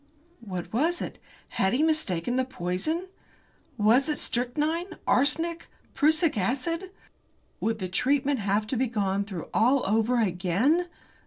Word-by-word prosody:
What 185 -4 -6
was 325 +9 +1
it? - - -6 0.3
Had 190 0 0
he 275 +5 +2
mistaken 245 - 0
the 260 - +2
poison? 255 - -2 0.7
Was 235 +7 +4
it 300 - 0
strychnine, 305 +9 -1
arsenic, 320 +6 +1 0.3
prussic 315 +1 +3
acid? 330 - -1 0.7
Would 225 0 -1
the 185 -3 -4
treatment 270 +8 +1
have 205 +1 0
to 225 - -3
be 255 +2 +1
gone 200 -3 -1
through 190 -5 -7
all 255 +4 +3
over 225 +4 +2
again? 210 - +1
250 Hz, 135 wpm, -27 LUFS, 200-310 Hz, 0.7 s, Was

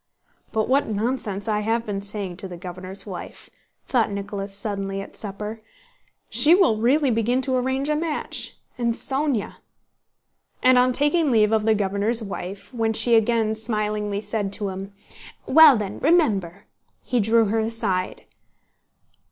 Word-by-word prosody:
"But 220 -1 0
what 275 +2 +2
nonsense 215 -2 -2
I 210 -1 +1
have 225 +2 -1
been 200 -2 -4
saying 200 -3 -5
to 195 0 -6
the 175 -2 -9
governor's 185 +2 -7
wife!" - - -9 0.3
thought 240 -4 +1
Nicholas 200 0 -5
suddenly 195 -1 -3
at 195 - -9
supper. 210 +2 -4 0.7
"She 320 +4 +6
will 360 - +3
really 265 +5 +2
begin 230 +3 +1
to 260 -1 0
arrange 260 +2 -1
a 300 - +1
match... 310 0 -3 0.2
and 235 -1 0
Sónya...?" 270 -4 -1 1.1
And 255 0 +6
on 250 +1 +3
taking 295 +4 +2
leave 215 -3 +3
of 220 -1 +1
the 220 - +4
governor's 205 +3 +1
wife, 195 +2 -7
when 225 -2 0
she 225 +2 +3
again 225 -1 +2
smilingly 210 -2 -2
said 205 -2 -3
to 200 -1 -1
him, 190 +1 -7 0.5
"Well 305 -2 +7
then, 205 -2 -5
remember!" 205 - +1 0.4
he 250 - 0
drew 225 +2 +3
her 225 +2 +1
aside. 220 -5 -2
220 Hz, 150 wpm, -23 LUFS, 200-250 Hz, 1.1 s, Well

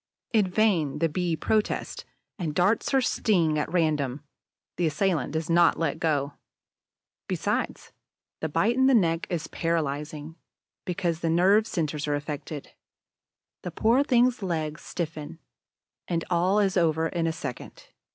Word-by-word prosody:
In 210 -4 +4
vain 180 -8 +2
the 165 - +2
Bee 175 +1 -1
protests 215 +6 -1 0.3
and 155 -4 -3
darts 190 +5 +2
her 270 -1 +3
sting 170 -10 +1
at 150 - -3
random; 150 -5 0 0.5
the 175 - +2
assailant 160 -3 0
does 160 +1 -2
not 170 0 +4
let 160 -1 -1
go. 145 -4 0 0.9
Besides, - - -2 0.5
the 160 - -2
bite 200 +10 +2
in 260 0 +4
the 270 - +5
neck 165 -5 +2
is 165 -3 -2
paralyzing, 155 -1 -3 0.5
because 175 -3 -1
the 165 - -1
nerve 195 +6 +4
centers 155 -6 -2
are 145 - +1
affected. 145 0 -6 0.9
The - - -5
poor 240 +5 +3
thing's 250 -3 +3
legs 160 -4 -3
stiffen; 160 -1 -5 0.7
and 165 -1 -1
all 180 +4 +2
is 195 -2 +2
over 160 -2 +2
in 165 -1 -1
a - - +1
second. 160 -7 -8
165 Hz, 140 wpm, -26 LUFS, 155-190 Hz, 0.9 s, the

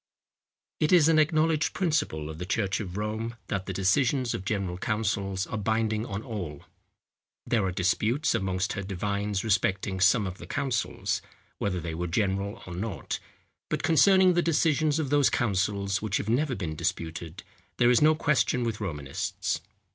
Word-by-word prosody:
It 155 - +2
is 170 -4 +6
an 160 -1 +5
acknowledged 155 0 +2
principle 145 - 0
of 80 0 -7
the 90 - -4
church 95 -1 0
of 95 -3 -5
Rome, 110 +2 -3
that 95 -2 -2
the - - -2
decisions 120 +7 +1
of 95 - -4
general 95 -3 -2
councils 100 -3 -1
are 110 - -4
binding 110 +1 0
on 100 +1 -4
all. 90 - -6 0.8
There 115 -4 +1
are 95 - 0
disputes 105 - +1
amongst 95 -4 -1
her 100 - -3
divines 100 +1 -2
respecting 95 -2 0
some 100 +3 +4
of 95 0 -6
the - - -9
councils, 130 -5 -1 0.4
whether 90 -3 -1
they 85 -1 -5
were 90 +2 -3
general, 100 +2 -1
or 90 - -7
not; 95 -3 -4 0.5
but - - -2
concerning 190 +3 +5
the 175 - +3
decisions 155 -2 +2
of 150 -4 -2
those 145 -2 +4
councils 100 -2 0
which 105 -2 0
have - - -4
never 130 +4 +1
been 85 -6 -4
disputed, 80 +2 -4 0.3
there 120 0 +5
is 120 - +4
no 155 +1 +6
question 145 -5 +1
with 115 -2 -3
Romanists. 75 -8 -3
105 Hz, 165 wpm, -27 LUFS, 95-130 Hz, 0.8 s, is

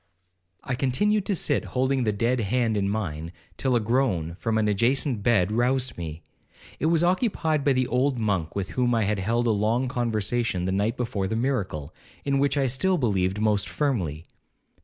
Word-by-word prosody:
'I 130 - -3
continued 195 +12 +1
to 200 - +1
sit 145 -4 +1
holding 130 -1 +1
the 110 - +2
dead 115 +5 0
hand 115 +1 0
in 100 -1 0
mine, 85 -6 -3 0.2
till 130 -2 0
a - - +4
groan 110 -8 0
from 110 +5 -1
an 110 -1 +2
adjacent 120 +3 +1
bed 105 -4 +2
roused 125 +3 +1
me. 80 -1 -7 0.6
It 155 - +1
was 165 0 +3
occupied 175 - +1
by 140 - +3
the 130 0 +1
old 125 +2 +1
monk 100 -8 -1
with 100 -1 -3
whom 125 -1 +1
I 115 - +2
had 105 0 0
held 115 +5 0
a 115 - +3
long 110 +5 +1
conversation 115 -5 -1
the 95 - 0
night 100 +4 0
before 105 -6 -2
the 110 - -2
miracle, 110 - -2 0.3
in 140 -1 +1
which 140 +1 +1
I 135 - +2
still 180 +9 +1
believed 100 - 0
most 105 -2 +1
firmly. 90 - -2
115 Hz, 185 wpm, -25 LUFS, 100-130 Hz, 0.6 s, a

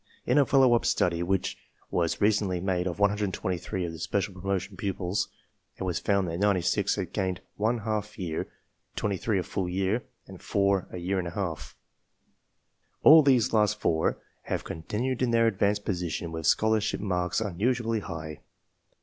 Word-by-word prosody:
In - - +4
a 140 - +4
follow 135 -3 +5
up 120 - +3
study 85 -1 +1
which 95 +1 -1 0.3
was 85 -2 0
recently 100 -3 +2
made 90 0 0
of 90 - -3
123 95 -3 -1
of 85 - -4
these 80 -1 -9
special 100 +2 -1
promotion 95 +1 -3
pupils, 95 -1 -2 0.5
it - - -5
was 90 -2 -1
found 100 -2 +1
that 85 +1 -3
96 100 0 +2
had 95 -4 -4
gained 95 -3 -1
one 110 +4 +1
half 105 -1 -3
year, 85 -4 -3 0.5
23 100 +1 -1
a 90 - 0
full 90 +1 -3
year, 95 +5 0 0.2
and - - -12
4 100 -2 +1
a - - -7
year 95 +2 -1
and 90 - -3
a 85 - -7
half. 90 -7 -4 1.3
All 160 +1 +10
these 130 -7 +3
last 105 -1 +3
four 80 -5 +1 0.3
have - - -2
con 80 - -6
tinued 125 +9 -2
in 125 - +2
their 115 0 +4
advanced 105 -1 +1
position 85 -3 -2
with 80 -1 -3
scholarship 110 +3 +2
marks 90 -3 -1
unusually 115 +3 0
high. 80 -5 -7
95 Hz, 165 wpm, -28 LUFS, 90-105 Hz, 1.3 s, All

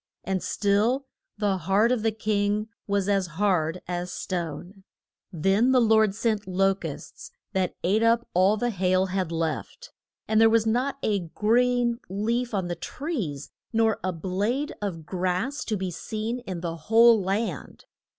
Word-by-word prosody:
And 190 -1 -1
still 215 +7 +1 0.3
the 205 -2 +1
heart 195 +7 +2
of 250 -3 +1
the 225 0 +1
king 210 0 -1 0.2
was 200 -1 0
as 195 -2 +1
hard 180 -4 +1
as 175 0 -3
stone. 180 +2 -5 0.5
Then 195 +9 +2
the 255 - +5
Lord 220 -3 +4
sent 215 -2 -1
lo 195 +1 +3
custs, 195 - -8 0.2
that 190 -2 0
ate 205 +5 +2
up 230 +1 +3
all 190 +4 +4
the 240 +2 0
hail 185 -1 +2
had 185 -2 -2
left, 165 - -3 0.4
and 220 0 +3
there 225 - +7
was 225 -1 +3
not 250 +5 0
a 205 -2 +1 0.2
green 240 +2 +2
leaf 230 +5 -1
on 195 -5 -1
the 175 - -2
trees 180 - -5 0.2
nor 225 -1 +2
a 185 - 0
blade 200 - -2
of 170 -6 -4
grass 185 - -2
to 215 - -1
be 185 -1 -3
seen 220 +7 -4
in 180 -3 -4
the 170 -1 -4
whole 225 +6 +5
land. 195 - -3
205 Hz, 160 wpm, -26 LUFS, 185-225 Hz, 0.5 s, there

